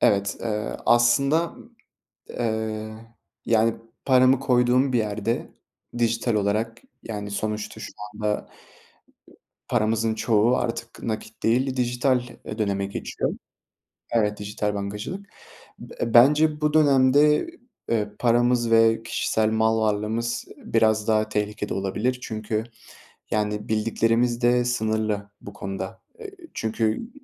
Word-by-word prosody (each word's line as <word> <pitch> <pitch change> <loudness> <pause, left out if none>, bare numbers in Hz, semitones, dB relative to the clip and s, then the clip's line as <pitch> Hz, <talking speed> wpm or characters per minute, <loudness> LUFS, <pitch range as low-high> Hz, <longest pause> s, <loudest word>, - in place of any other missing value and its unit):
Evet, 100 0 +2
eee, 105 -2 -3
aslında, 140 +8 +3 0.9
ııı, 110 -1 -2 0.5
yani 115 0 +3 0.3
paramı 130 0 +5
koyduğum 125 0 +2
bir - - +4
yerde 110 +1 -2 0.5
dijital 115 0 +1
olarak, 105 +3 -1 0.2
yani 105 -2 -5
sonuçta 105 +1 -3
şu - - -7 0.2
anda 105 0 -2 1.2
paramızın 110 -1 +1
çoğu 115 +2 +3
artık 115 0 -4
nakit 110 0 -5
değil, 130 +3 +1
dijital, 125 +1 +1 0.2
eee, 110 - -6
döneme 100 -2 0
geçiyor. 100 - -3 0.8
Evet, 105 -3 +1
dijital 105 0 -2
bankacılık. 105 - -5 0.5
B 115 - -5
bence 150 +5 +5
bu 150 0 +1
dönemde, 145 - +4 0.4
eee, 105 -3 +1
paramız 120 0 +2
ve 115 0 +4
kişisel 110 -1 0
mal 110 0 +2
varlığımız 110 +2 -1
biraz 110 -1 +1
daha 110 -1 +2
tehlikede 105 0 -2
olabilir. 105 +6 -1
Çünkü 110 -1 -3 0.7
yani 105 0 -1
bildiklerimiz 115 +2 +1
de 120 0 +3
sınırlı 110 -3 -1
bu 100 - -10
konuda. 95 -1 -6 0.2
Eee, 425 -3 -8 0.2
çünkü 110 - -1
110 Hz, 110 wpm, -24 LUFS, 105-120 Hz, 1.2 s, paramı